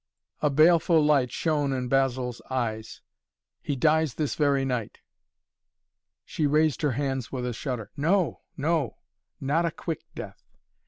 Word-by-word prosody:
A 150 Hz, -, +3 dB
baleful 160 Hz, +2 st, +5 dB
light 140 Hz, -5 st, +3 dB
shone 150 Hz, -4 st, 0 dB
in 130 Hz, -1 st, -2 dB
Basil's 130 Hz, -2 st, 0 dB
eyes. 110 Hz, -4 st, -3 dB, 0.6 s
"He 145 Hz, -, -2 dB
dies 155 Hz, 0 st, +2 dB
this 150 Hz, -3 st, -1 dB
very 140 Hz, -3 st, +2 dB
night." 125 Hz, -5 st, -3 dB, 1.3 s
She 155 Hz, -, -1 dB
raised 150 Hz, -1 st, +2 dB
her 145 Hz, -4 st, +1 dB
hands 135 Hz, -2 st, -2 dB
with 125 Hz, -2 st, -3 dB
a 125 Hz, -, -2 dB
shudder. 120 Hz, -3 st, -5 dB
"No 170 Hz, +4 st, +1 dB, 0.2 s
no! 150 Hz, -4 st, 0 dB, 0.4 s
Not 160 Hz, +5 st, +1 dB
a -, -, +1 dB
quick 165 Hz, 0 st, -5 dB
death! -, -, -8 dB
140 Hz, 140 wpm, -26 LUFS, 125-155 Hz, 1.3 s, baleful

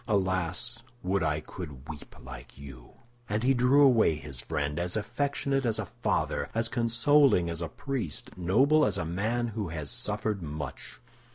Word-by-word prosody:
Alas, 95 Hz, +3 st, 0 dB, 0.2 s
would 95 Hz, +1 st, +1 dB
I 75 Hz, -1 st, 0 dB
could 75 Hz, -4 st, -9 dB
weep 75 Hz, -3 st, -9 dB
like 65 Hz, -1 st, -11 dB
you!" 65 Hz, -3 st, -12 dB, 0.4 s
And 105 Hz, +2 st, 0 dB
he 135 Hz, +2 st, +4 dB
drew 130 Hz, +3 st, +5 dB
away 120 Hz, -, +5 dB
his 70 Hz, -4 st, -6 dB
friend, 75 Hz, +2 st, -2 dB
as 90 Hz, +1 st, -1 dB
affectionate 135 Hz, +4 st, -1 dB
as 115 Hz, -3 st, 0 dB
a -, -, -2 dB
father, -, -, -1 dB
as 115 Hz, 0 st, +1 dB
consoling 120 Hz, -5 st, +3 dB
as 85 Hz, 0 st, -4 dB
a 85 Hz, -, -2 dB
priest, 135 Hz, -, -4 dB
noble 130 Hz, -, +4 dB
as 100 Hz, -6 st, +2 dB
a 80 Hz, -, -2 dB
man 110 Hz, +8 st, -1 dB
who 110 Hz, -3 st, -3 dB
has 80 Hz, -3 st, -5 dB
suffered 105 Hz, -3 st, -1 dB
much. 75 Hz, -3 st, -7 dB
95 Hz, 165 wpm, -29 LUFS, 80-120 Hz, 0.4 s, drew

